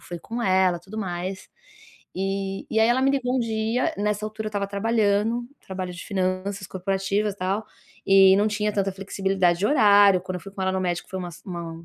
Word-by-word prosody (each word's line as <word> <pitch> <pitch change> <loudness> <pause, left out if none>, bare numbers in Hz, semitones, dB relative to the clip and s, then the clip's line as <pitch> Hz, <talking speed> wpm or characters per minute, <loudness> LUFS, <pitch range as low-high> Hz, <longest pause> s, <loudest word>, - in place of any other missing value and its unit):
fui 175 -1 -8
com 235 +7 -5
ela, 185 -2 +3
tudo 200 +5 -9
mais, 185 0 -4 0.7
e 195 +1 -3
e 220 - +2
aí 220 - +5
ela 250 +2 +2
me 270 - +4
ligou 260 -2 0
um - - +2
dia, 225 +2 0
nessa 210 0 -1
altura 215 0 -6
eu - - -3
estava 200 -1 -2
trabalhando, 220 +2 +1 0.2
trabalho 185 -1 -5
de 170 - -9
finanças 190 0 -2
corporativas, 195 +2 -1
tal, 195 +3 -2 0.4
e 195 -1 +7
não 205 +2 +3
tinha 210 0 -1
tanta 195 -2 0
flexibilidade 190 -2 0
de 205 - +2
horário, 205 -8 +6
quando 185 0 -4
eu 180 - -7
fui 195 - -11
com 195 -1 -5
ela 190 - +1
no 190 - -1
médico, 175 -1 -2
foi 190 - -4
uma 180 -1 -5
s 165 - -14
uma 170 -2 -6
195 Hz, 210 wpm, -24 LUFS, 185-215 Hz, 0.7 s, e